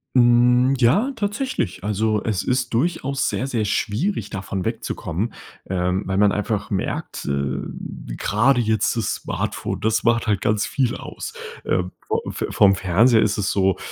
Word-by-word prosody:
Hm, 125 Hz, +1 st, +5 dB
ja 195 Hz, -, +3 dB
tatsächlich. 205 Hz, -, -2 dB
Also 105 Hz, +1 st, 0 dB
es 105 Hz, -5 st, 0 dB
ist 125 Hz, -1 st, 0 dB
durchaus 140 Hz, 0 st, 0 dB
sehr, 130 Hz, -, -2 dB
sehr 120 Hz, -5 st, -1 dB
schwierig, 115 Hz, -, -1 dB
davon 95 Hz, -2 st, -4 dB
wegzukommen, 100 Hz, +9 st, -3 dB, 0.4 s
ähm, 90 Hz, 0 st, 0 dB
weil 95 Hz, 0 st, -1 dB
man 100 Hz, 0 st, +5 dB
einfach 105 Hz, 0 st, -2 dB
merkt, 95 Hz, -, -3 dB
äh, 70 Hz, -1 st, -1 dB, 0.6 s
grade 125 Hz, +6 st, +2 dB
jetzt 110 Hz, -2 st, +1 dB
das 115 Hz, -, 0 dB
Smartphone, -, -, -3 dB
das 110 Hz, 0 st, +1 dB
macht 115 Hz, 0 st, +2 dB
halt 105 Hz, -3 st, +1 dB
ganz 105 Hz, -1 st, +1 dB
viel 130 Hz, -4 st, 0 dB
aus. -, -, -7 dB, 0.3 s
Ähm, 90 Hz, 0 st, 0 dB, 0.2 s
vo -, -, 0 dB
Fe -, -, -3 dB
vorm 100 Hz, -1 st, +5 dB
Fernseher 105 Hz, +6 st, +4 dB
ist 105 Hz, -1 st, +1 dB
es 100 Hz, -, 0 dB
so, 95 Hz, -2 st, +2 dB
110 Hz, 155 wpm, -22 LUFS, 95-125 Hz, 0.6 s, Hm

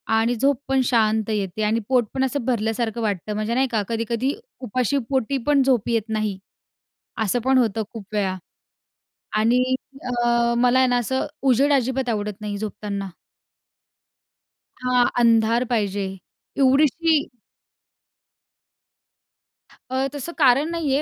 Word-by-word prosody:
आणि 230 Hz, +2 st, +2 dB
झोप 275 Hz, +2 st, +1 dB
पण 270 Hz, 0 st, +2 dB
शांत 220 Hz, -3 st, +1 dB
येते 210 Hz, -1 st, -2 dB
आणि 215 Hz, +2 st, +1 dB
पोट 250 Hz, -3 st, +3 dB
पण 265 Hz, -, 0 dB
असं 265 Hz, -1 st, -2 dB
भरल्यासारखं 225 Hz, -1 st, -1 dB
वाटतं 210 Hz, -1 st, -2 dB
म्हणजे 215 Hz, +2 st, -2 dB
नाही 265 Hz, +2 st, +2 dB
का? 220 Hz, -3 st, +1 dB
कधी-कधी 230 Hz, +4 st, -1 dB, 0.3 s
उपाशी 255 Hz, +2 st, 0 dB
पोटी 270 Hz, 0 st, 0 dB
पण 290 Hz, -2 st, +4 dB
झोप 255 Hz, -4 st, +1 dB
येत 230 Hz, -2 st, 0 dB
नाही. 215 Hz, -3 st, -1 dB, 0.9 s
असं 220 Hz, +4 st, 0 dB
पण 265 Hz, 0 st, +4 dB
होतं 225 Hz, -3 st, +1 dB
खूप 225 Hz, -4 st, -8 dB
वेळा. 195 Hz, -3 st, 0 dB, 1.0 s
आणि 230 Hz, +4 st, +3 dB, 0.4 s
अ, 240 Hz, -1 st, +1 dB
मला 250 Hz, +1 st, +4 dB
आहे 260 Hz, -, +5 dB
ना 245 Hz, -, +2 dB
असं 260 Hz, +2 st, -1 dB, 0.2 s
उजेड 275 Hz, +2 st, +3 dB
अजिबात 260 Hz, -1 st, 0 dB
आवडत 210 Hz, -2 st, -3 dB
नाही 210 Hz, -1 st, -4 dB
झोपताना. 205 Hz, -1 st, -5 dB, 1.8 s
हां. 250 Hz, -1 st, +3 dB
अंधार 230 Hz, +1 st, +3 dB
पाहिजे. 205 Hz, -3 st, 0 dB, 0.5 s
एवढीशी 290 Hz, +3 st, +3 dB, 2.7 s
अ, 260 Hz, +1 st, 0 dB
तसं 290 Hz, +4 st, -5 dB
कारण 280 Hz, +1 st, +4 dB
नाहीये 300 Hz, -5 st, 0 dB
240 Hz, 130 wpm, -22 LUFS, 215-265 Hz, 2.7 s, आहे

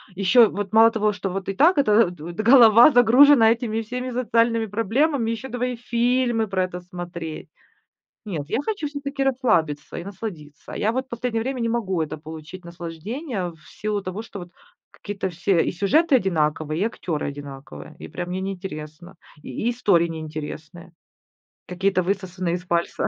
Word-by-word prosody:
еще 210 Hz, +5 st, +5 dB
вот 200 Hz, -1 st, -5 dB
мало 225 Hz, +1 st, +7 dB
того, 215 Hz, -1 st, +1 dB
что 200 Hz, -1 st, -4 dB
вот 190 Hz, +1 st, -4 dB
и 195 Hz, -, -1 dB
так 325 Hz, -, +4 dB
это 230 Hz, -5 st, +5 dB
вот 175 Hz, -1 st, -8 dB
д 215 Hz, -, -2 dB
голова 235 Hz, +1 st, +8 dB
загружена 245 Hz, -1 st, +6 dB
этими 225 Hz, -1 st, -1 dB
всеми 250 Hz, +3 st, -5 dB
социальными 230 Hz, -2 st, +1 dB
проблемами, 230 Hz, +4 st, 0 dB
еще 260 Hz, +4 st, -5 dB
давай 250 Hz, 0 st, -2 dB
и -, -, -5 dB
фильмы 240 Hz, -1 st, 0 dB
про 190 Hz, -2 st, 0 dB
это 180 Hz, -1 st, -5 dB
смотреть. 175 Hz, -3 st, -8 dB, 0.8 s
Нет, 165 Hz, -8 st, -5 dB
я -, -, 0 dB
хочу 410 Hz, -6 st, -3 dB
всё-таки 285 Hz, -1 st, -4 dB
расслабиться 215 Hz, -, 0 dB
и 170 Hz, -, -7 dB
насладиться. 175 Hz, -7 st, -8 dB
Я 220 Hz, +2 st, 0 dB
вот 260 Hz, +1 st, -3 dB
последнее 235 Hz, -2 st, -2 dB
время 265 Hz, +1 st, -3 dB
не 230 Hz, -, 0 dB
могу 195 Hz, -7 st, -1 dB
это 155 Hz, 0 st, -5 dB
получить 160 Hz, +3 st, -10 dB
наслаждение, 180 Hz, -, -5 dB
в 160 Hz, -, -21 dB
силу 210 Hz, -1 st, -3 dB
того, 185 Hz, +3 st, -5 dB
что 225 Hz, -, -10 dB
вот 175 Hz, -, -10 dB, 0.4 s
какие-то 200 Hz, -2 st, -5 dB
все 175 Hz, +1 st, +1 dB
и -, -, -2 dB
сюжеты 270 Hz, -, +3 dB
одинаковые, 155 Hz, -, 0 dB
и -, -, +3 dB
актеры 175 Hz, -8 st, -3 dB
одинаковые. 140 Hz, +1 st, -10 dB
И -, -, -9 dB
прям 175 Hz, 0 st, -6 dB
мне 185 Hz, +1 st, -3 dB
неинтересно, 180 Hz, -3 st, -7 dB, 0.3 s
и -, -, -9 dB, 0.2 s
и 240 Hz, -, +3 dB
истории 200 Hz, -8 st, +2 dB
неинтересные, 155 Hz, +1 st, -8 dB, 0.8 s
какие-то 185 Hz, +1 st, 0 dB
высосанные 185 Hz, -2 st, -2 dB
из 180 Hz, -, -6 dB
пальца. 170 Hz, -1 st, -1 dB
200 Hz, 170 wpm, -23 LUFS, 175-235 Hz, 0.8 s, голова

